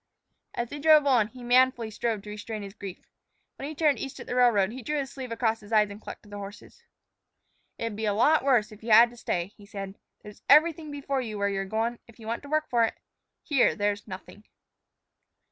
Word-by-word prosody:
As 240 -1 -2
they 290 - -6
drove 305 0 +6
on, 245 -6 +4
he 250 +2 -13
manfully 245 -2 +3
strove 220 -1 -2
to 210 - -8
restrain 210 0 -6
his 195 -1 -8
grief. 195 -3 -9 0.5
When 275 - -5
he 310 - -7
turned 300 -2 +2
east 270 - -6
at - - -8
the - - -5
railroad, 230 -6 +4
he 255 +3 -7
drew 300 +6 -2
his 275 -1 -3
sleeve 260 -3 -7
across 225 -1 0
his 210 +1 -15
eyes 210 -2 +3
and 205 +2 -10
clucked - - -9
to 210 - -17
the 205 0 -7
horse. 205 - -11 1.0
"It'd 230 -2 -4
be 220 +1 -3
a 205 - +1
lot 300 +8 +4
worse 240 -6 +2
if 215 - -13
you 230 - -6
had 230 +2 +7
to - - -14
stay," 180 -4 -3
he 205 - -16
said. 195 -2 -6 0.3
"There's 210 0 -12
everything 315 +1 +5
before 280 -2 -2
you 220 -4 -5
where 200 0 +1
you're 195 -1 -2
goin', 225 +4 -2
if 235 - -17
you 225 - -12
want 230 +1 -3
to 285 - -12
work 310 +1 0
for 235 -2 +2
it. 225 - 0 0.5
Here 275 -5 +3
there's 205 0 -1
nothing." 190 +2 -10
230 Hz, 230 wpm, -27 LUFS, 210-265 Hz, 1.0 s, had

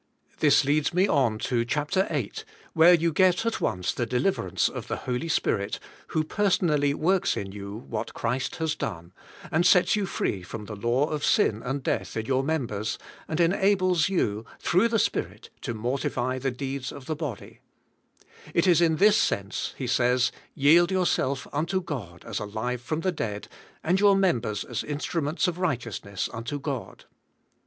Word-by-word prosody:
This - - +5
leads 150 +3 +1
me 185 +2 +4
on 130 - +2
to 120 -2 +1
chap 145 +5 -2
ter 190 0 +2
8, 440 - -3 0.3
where 170 +2 +7
you 165 -1 0
get 185 +5 +3
at 230 - -1
once 90 -4 -1
the 120 - -2
deliverance 125 - +1
of - - -6
the - - -2
Holy 125 +6 -2
Spirit, 100 -9 0 0.3
who 160 -2 0
personally 155 -6 +1
works 185 +5 +1
in 95 -1 -4
you 100 0 -7
what 110 0 -4
Christ 125 +3 -2
has 160 -1 -1
done, 85 - -5 0.4
and 165 +2 +3
sets 180 +2 +5
you 205 -2 -1
free 95 - -2
from 105 +4 -7
the 105 - -7
law 120 +7 +1
of 150 -2 -3
sin 110 0 +3
and 135 +2 -3
death - - -2
in 110 - -2
your 130 +2 +1
members, 120 -9 -2 0.3
and 160 - -3
enables 185 -1 +3
you, 110 - 0
through 180 +9 +3
the 230 -1 +1
Spirit, - - -2
to 115 - -4
mortify 125 +2 -1
the 135 +1 -1
deeds 135 0 -4
of 140 -2 -10
the 155 - -2
body, 145 -8 -6 1.0
It 170 - +3
is 175 -2 +5
in 165 -2 +4
this 205 +5 +5
sense 100 +1 -1
he 135 - -3
says, 125 +1 +2 0.2
"Yield 165 +5 +5
yourself 175 -8 0
unto 165 +6 0
God 115 - -7
as 115 -2 -3
alive 110 +4 -3
from 155 +6 -3
the 185 - +1
dead, 105 -10 -4 0.4
and 180 +4 +2
your 200 -1 +6
members 120 - +1
as - - -4
instru 150 +3 -3
ments 155 +6 0
of 180 0 -3
righteousness 115 - -2
unto 120 +6 -4
God." 140 -3 -5
140 Hz, 175 wpm, -26 LUFS, 115-175 Hz, 1.0 s, where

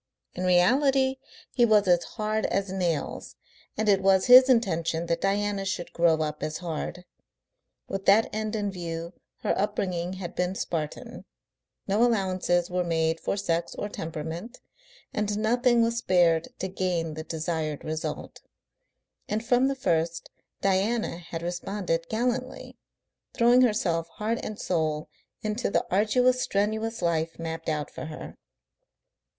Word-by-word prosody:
In 185 - -3
reality 265 +9 +3 0.3
he 245 - +2
was 215 -4 +4
as 175 -1 +4
hard 215 -1 -2
as 195 -1 -1
nails, 175 -5 -2 0.4
and 220 - 0
it 195 -2 +4
was 190 -1 +4
his 255 +1 +9
intention 170 -9 +1
that 170 0 -1
Diana 200 0 0
should 190 -2 -4
grow 165 -2 +3
up 150 0 -4
as 155 0 -3
hard. 175 +1 -5 0.8
With 195 0 -5
that 210 +3 +6
end 215 0 -2
in 205 -2 -1
view 170 -1 -5 0.3
her - - +1
upbringing 185 -3 -1
had 185 -2 -6
been 180 +1 -1
Spartan, 155 -5 -4 0.6
no 205 +4 +3
allowances 185 -6 +1
were 180 0 -1
made 165 -1 0
for - - -2
sex 170 -4 -1
or 205 - -4
temperament 165 +6 -6 0.5
and 210 -1 -1
nothing 240 +2 +3
was 230 0 0
spared 175 -7 +3
to 190 - -3
gain 180 -4 -2
the 155 +1 -6
desired 160 -2 -3
result. 155 0 -5 0.9
And 220 +2 -2
from 245 +2 +3
the 275 - -1
first 170 -7 -1 0.3
Diana 195 +1 +1
had 165 -1 -7
responded 175 -1 -2
gallantly, 250 +3 -2 0.6
throwing 240 +1 +5
herself 180 -9 +1
heart 225 +2 -1
and 215 - -6
soul 155 -3 -1 0.3
into 215 +3 -1
the - - +1
arduous, 250 +6 +3
strenuous 220 +2 -1
life 165 -1 0
mapped 165 0 -4
out 150 -2 -2
for - - -7
her. 155 0 -8
190 Hz, 140 wpm, -27 LUFS, 165-220 Hz, 0.9 s, his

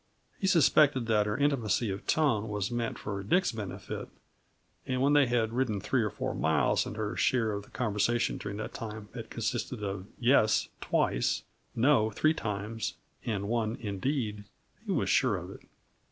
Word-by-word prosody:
He 190 - 0
suspected 150 -7 +4
that 105 -2 +2
her 105 +1 -1
intimacy 120 -7 +1
of 95 - -6
tone 115 -9 +2
was 105 +1 -2
meant 120 -1 -2
for 100 -1 -4
Dick's 125 - +2
benefit; 110 -5 -6 0.8
and 130 -1 0
when 140 +2 +3
they 145 -2 +5
had 115 -2 +1
ridden 120 -5 0
three 120 +6 +1
or 105 - 0
four - - -3
miles 80 0 +2
and 105 - -6
her 110 +1 -2
share 115 -4 +2
of 100 0 -4
the - - -21
conversation 120 0 0
during 105 -1 -5
that 110 - -5
time 110 -2 -7
had 115 -2 -7
consisted 115 0 -3
of 100 -1 -4
"yes" 120 -3 +4
twice, - - +1 0.3
"no" 115 -3 +4
three 155 +7 +2
times, 110 -3 -3 0.3
and 100 -3 -1
one 115 0 0
"indeed," 105 0 -2 0.4
he - - -4
was - - +1
sure - - +3
of - - -7
it. - - -11
110 Hz, 170 wpm, -30 LUFS, 105-125 Hz, 0.8 s, they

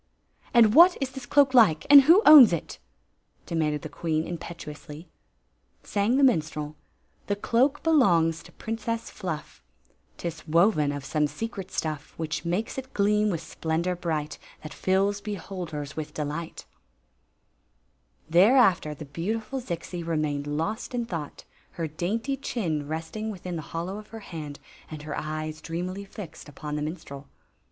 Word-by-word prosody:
"And 225 -3 +6
what 345 +5 +8
is 270 -2 -2
this 260 -2 -9
cloak 280 -2 +4
like 210 -11 +5
— - - -29
and 285 -1 +12
who 335 +10 +6
owns 290 -9 +10
it? 170 - -4 0.7
demanded 150 -3 -1
the - - -4
queen, 160 +1 -2
impetuously. 165 -2 -8 0.8
Sang 210 +5 +1
the 280 - +3
minstrel: 155 - +1 0.5
"The 205 - 0
cloak 255 +7 +1
belongs 175 - +3
to - - -15
Princess 225 +1 -4
Fhiff; 170 -7 -6 0.6
T - - -4
is 165 -1 -7
woven 165 -2 +3
of 145 -1 -6
some 150 +1 +1
secret 195 +1 -6
stuff 155 -5 -4
Which 160 0 -3
makes 180 +9 -2
it 265 0 -11
gleam 210 +1 +2
with 170 -5 -2
splendor 165 +2 -2
bright 155 -4 -3 0.2
That 155 -1 -8
fills 195 +2 +1
beholders 180 -8 -6
with 155 -2 -6
delighL 150 +2 -5 1.6
Thereafter 185 - +4
the 155 - -9
beautiful 215 - -3
Zixi 175 -3 -5
remained 155 -3 -2
lost 165 +12 -3
in 240 -1 -1
thought, 165 -9 -6 0.3
her 165 -2 -3
dainty 210 - -2
chin 165 - -3
resting 160 +8 -4
within 185 -3 -6
the 160 - -3
hollow 175 +5 -4
of 215 - -12
her 225 -1 -10
hand 155 -6 -8 0.3
and 155 -1 -8
her 150 -1 -5
eyes 155 0 -4
dreamily 180 +4 -5
fixed 175 -7 -10
upon 150 +1 -6
the 150 - -2
minstrel. 150 -3 -6
170 Hz, 150 wpm, -26 LUFS, 155-215 Hz, 1.6 s, and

